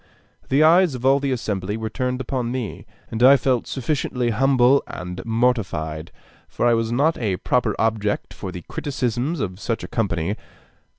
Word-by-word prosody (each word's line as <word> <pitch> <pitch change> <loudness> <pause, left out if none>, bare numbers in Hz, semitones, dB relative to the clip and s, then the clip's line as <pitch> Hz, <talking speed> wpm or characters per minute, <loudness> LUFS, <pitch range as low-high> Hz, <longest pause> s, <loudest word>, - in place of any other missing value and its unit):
The 140 +3 +4
eyes 170 -1 +5
of 125 0 -6
all 135 +1 +5
the 140 -1 -1
assembly 105 -4 -2
were 110 0 -3
turned 125 +2 -2
upon 125 -1 -2
me, 125 -5 -5 0.2
and 110 - -3
I 135 +3 +8
felt 130 -3 0
sufficiently 125 -2 -1
humble 130 +2 +4
and 90 0 -6
mortified, 95 -10 -1 0.4
for - - -2
I 120 - +5
was 115 0 0
not 145 +7 +2
a 100 -6 -1
proper 120 -1 0
object 110 -2 -1
for 95 - -6
the 90 -2 -8
criticisms 135 - -2
of 95 -5 -3
such 115 +1 -3
a - - -5
company. 100 -2 -1
120 Hz, 170 wpm, -22 LUFS, 105-130 Hz, 0.4 s, I